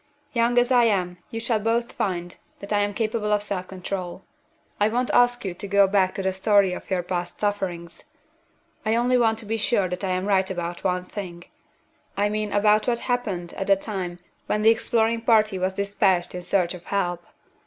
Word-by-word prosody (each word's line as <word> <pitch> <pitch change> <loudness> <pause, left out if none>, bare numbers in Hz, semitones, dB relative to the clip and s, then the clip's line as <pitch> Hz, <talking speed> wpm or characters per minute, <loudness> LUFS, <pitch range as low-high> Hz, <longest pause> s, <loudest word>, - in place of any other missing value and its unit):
Young 235 0 +2
as 245 +1 +4
I 245 -2 +5
am, 180 -5 0
you 225 - -4
shall 225 -1 0
both 230 +2 0
find 175 -2 -3 0.2
that 200 +1 -5
I 205 - +3
am 205 0 +1
capable 215 0 -1
of 210 0 +2
self 185 -3 -4
control. 185 -1 -5 0.6
I 210 +1 +3
won't 245 +3 0
ask 245 -2 +3
you 185 - -2
to 190 +3 -8
go 200 0 +5
back 190 -1 +2
to 195 - -3
the 190 0 0
story 195 -1 +3
of - - -8
your 185 -2 0
past 175 0 -4
sufferings; 180 -5 -3 0.8
I 220 +1 +1
only 245 +2 +2
want 225 -3 +3
to 225 - -9
be 225 +2 -1
sure 205 -3 +1
that 180 +2 -5
I 190 - -1
am 185 +1 -1
right 190 -2 +2
about 175 -2 -4
one 180 -1 0
thing 180 -2 -7 0.7
I 205 +1 +2
mean 210 0 -2
about 210 +2 +3
what 240 -1 +2
happened 210 -9 -3
at 195 - -4
the 200 - +6
time 190 -3 -5 0.3
when 210 0 0
the 220 - +7
exploring 230 0 +1
party 215 -4 +3
was 185 +1 -1
dispatched 200 -3 +1
in 180 - -5
search 180 0 0
of 175 -1 -11
help. 175 -3 -1
200 Hz, 205 wpm, -24 LUFS, 185-220 Hz, 0.8 s, the